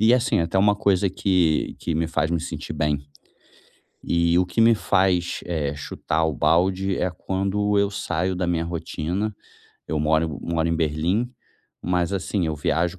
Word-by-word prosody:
E 110 +3 +6
assim 125 -8 +2
até 85 +3 0
uma 105 +1 +4
coisa 100 -1 +2
que 90 -4 +1
que 85 - -3
me 80 +1 0
faz 80 0 0
me 85 -2 0
sentir - - -6
bem. 75 -2 -1 1.0
E 85 0 +2
o 90 - +3
que 90 +5 0
me 115 0 +6
faz, 95 -4 +1
eh, 75 -5 -2
chutar 75 +2 -2
o 80 - -1
balde 95 +6 +2
é 90 - 0
quando 100 +3 -1
eu 100 0 +2
saio 95 -1 -2
da 90 0 -1
minha 85 -1 0
rotina. 85 +4 -3 0.5
Eu 80 - -1
moro 80 0 +1
moro 85 -1 0
em 85 - +1
Berlim, 85 +10 0 0.5
mas 90 0 0
assim 95 -2 -1
eu 80 - -1
viajo 85 +5 0
90 Hz, 170 wpm, -23 LUFS, 80-95 Hz, 1.0 s, E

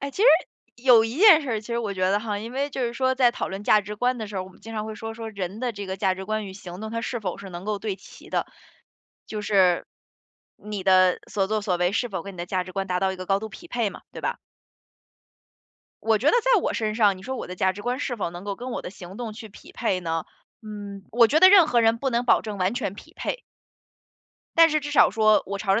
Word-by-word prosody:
哎， 280 0 -4
其 390 - -2
实， - - +7 0.5
有 240 -2 +6
一 225 +3 -4
件 375 -6 +8
事 270 - -4
儿， 220 -2 -1
其 215 - -15
实 235 0 -1
我 210 -4 -3
觉 185 0 +1
得 205 +1 +2
哈， 210 -2 -3
因 225 +3 -7
为 275 +2 -1
就 265 - -3
是 235 - -1
说 260 +2 +1
在 250 -2 +4
讨 - - -3
论 195 +2 -6
价 215 - +5
值 210 +1 -7
观 245 +2 0
的 220 - -4
时 205 -1 -7
候， 185 - -1
我 - - -12
们 190 - -19
经 225 0 -9
常 215 -1 -2
会 220 - -6
说， 225 +1 -6
说 225 -1 -7
人 200 -1 -5
的 250 -2 -1
这 205 -1 -7
个 190 0 -4
价 190 -1 +1
值 190 +1 -7
观 215 +1 -2
与 190 - -8
行 185 -1 -9
动 220 0 -5
他 230 0 -3
是 240 +1 -3
否 200 - -4
是 195 - -9
能 175 +1 -8
够 210 0 -2
对 200 -2 -3
齐 - - -15
的。 - - 0 0.8
就 215 -1 -5
是， 190 -4 +3 0.7
你 210 -2 -6
的 185 -1 +5
所 195 -2 0
作 215 +2 -1
所 185 -3 0
为 180 +1 +1
是 245 +3 0
否 190 -6 -4
跟 200 +1 -9
你 - - -15
的 175 - -4
价 185 0 -1
值 185 - -10
观 195 +1 -2
达 180 -1 -1
到 190 0 +1
一 - - -7
个 185 0 -7
高 195 +1 +2
度 220 - -5
匹 345 - -12
配 235 -8 -1
嘛， - - -12
对 - - -8
吧？ - - -2 1.7
我 225 -1 +3
觉 245 - -3
得 - - +4
在 - - +4
我 - - -1
身 215 -1 -1
上， 210 -4 +3
你 - - -13
说 260 +5 -4
我 - - -5
的 180 - -7
价 190 +1 +1
值 205 +2 -9
观 250 +4 -2
是 245 -4 -2
否 195 -5 -2
能 175 +1 -9
够 200 -1 -4
跟 250 +1 -6
我 - - -3
的 - - -6
行 185 0 -11
动 230 -2 -5
去 220 +1 -10
匹 200 - -15
配 195 -6 -1
呢？ 165 -2 -2 0.4
嗯， 205 -2 -8
我 235 0 +6
觉 290 +7 +3
得 375 - +10
任 380 -5 +8
何 245 -5 +3
人 225 0 +3
不 270 - -1
能 240 0 0
保 245 - +4
证 210 -2 -5
完 185 +4 +1
全 220 -6 -3
匹 315 +10 -14
配。 - - -4 1.1
但 330 0 +7
是 305 0 +1
至 290 0 -5
少 290 - +5
说， 215 -1 +4
我 200 +1 -4
朝 195 -1 +1
着 210 - +2
215 Hz, 305 characters per minute, -25 LUFS, 195-240 Hz, 1.7 s, 得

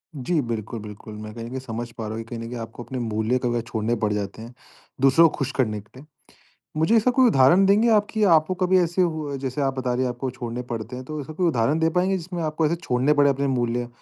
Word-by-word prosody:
जी 150 +5 -1
बिल्कुल, 115 -2 -4
बिल्कुल। 105 +1 -10
मैं 105 0 -8
कहीं 115 0 -7
न - - -7
कहीं 130 +1 -4
समझ 120 -1 -6
पा 115 -1 -7
रहा 110 +1 -4
हूँ 115 - -4
कहीं 115 0 -7
न 115 - -6
कहीं 120 -1 -5
आपको 115 +1 -8
अपने 130 +1 -5
मूल्य 110 +2 0
कभी 120 -1 0
छोड़ने 115 0 -1
पड़ 105 - +2
जाते 105 +1 -4
हैं, 115 +2 -10 0.5
दूसरों 140 +5 +6
को - - -9
खुश 135 -1 -2
करने 110 -5 0
के 115 +5 -17
लिए। 145 - -13 0.7
मुझे 160 +9 +3
ऐसा 235 +3 +3
कोई 255 0 +5
उदाहरण 175 - +5
देंगे 210 +4 +4
आप 210 0 +3
कि 220 -1 0
आपको 155 +4 -1
कभी 185 0 +4
ऐसे 175 +1 +1
हुआ 155 -4 -1
है 140 - -3
जैसे 135 +1 -3
आप 135 -1 +1
बता 125 -1 -1
रहे 130 +1 0
हैं - - 0
आपको 125 +2 -4
छोड़ने 120 -1 -5
पड़ते 115 +2 -5
हैं 130 0 -7
तो 155 +1 -5
ऐसा 155 +3 -8
कोई 180 +2 +1
उदाहरण 145 +1 +1
दे 160 0 +3
पाएँगे, 185 +3 +1
जिसमें 175 0 -5
आपको 155 +1 0
ऐसे 165 - +1
छोड़ने 135 -3 +1
पड़े 145 -1 +4
अपने 140 +1 0
मूल्य? 120 -2 -1
130 Hz, 265 wpm, -24 LUFS, 115-160 Hz, 0.7 s, दूसरों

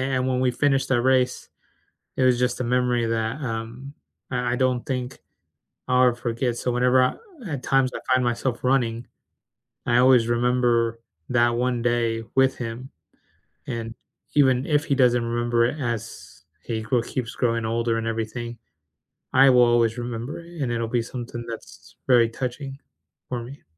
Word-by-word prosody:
and 130 0 0
when 130 -1 0
we 130 -1 +2
finished 135 +1 +1
that 125 -2 +3
race, 130 0 +1 0.7
it - - 0
was 125 -1 +4
just 125 0 0
a - - 0
memory 125 -1 +1
that, 115 +5 -2
um, 115 +2 -5 0.4
I 125 -1 0
I - - +1
don't 130 -1 0
think 125 -1 -4 0.7
I'll 125 0 +5
ever 120 - 0
forget. 120 0 -2
So 125 - -2
whenever 125 +1 +3
I 125 - +2 0.4
at 140 -4 -4
times 135 -1 +2
I - - -3 0.2
find 130 -1 +2
myself 120 +1 -1
running, 120 -3 +1 0.8
I 120 0 +3
always 125 -2 +5
remember 120 -1 +1 0.3
that 120 -1 +3
one 125 0 0
day 115 -1 0
with 135 0 +3
him. 120 +2 -6 0.8
And 115 -1 -5 0.4
even 130 -3 +4
if 145 -2 +2
he - - 0
doesn't 120 -3 +3
remember 120 0 +1
it 145 +6 -2
as 115 -2 -5 0.2
he 110 -1 -3
gro 120 +2 +1
keeps 120 0 -4
growing 115 -2 0
older 115 0 0
and 115 - -3
everything, 115 +1 -4 0.8
I 135 +1 +7
will 125 -1 +6
always 120 -1 +3
remember 120 +4 -5
it, 170 -2 -10
and 125 - -1
it'll 115 -1 -1
be 120 0 +1
something 120 0 -6
that's 115 - -10
very 120 -3 +5
touching 135 +3 -5 0.5
for 125 -2 -3
me. 135 +4 -11
120 Hz, 165 wpm, -24 LUFS, 115-130 Hz, 0.8 s, I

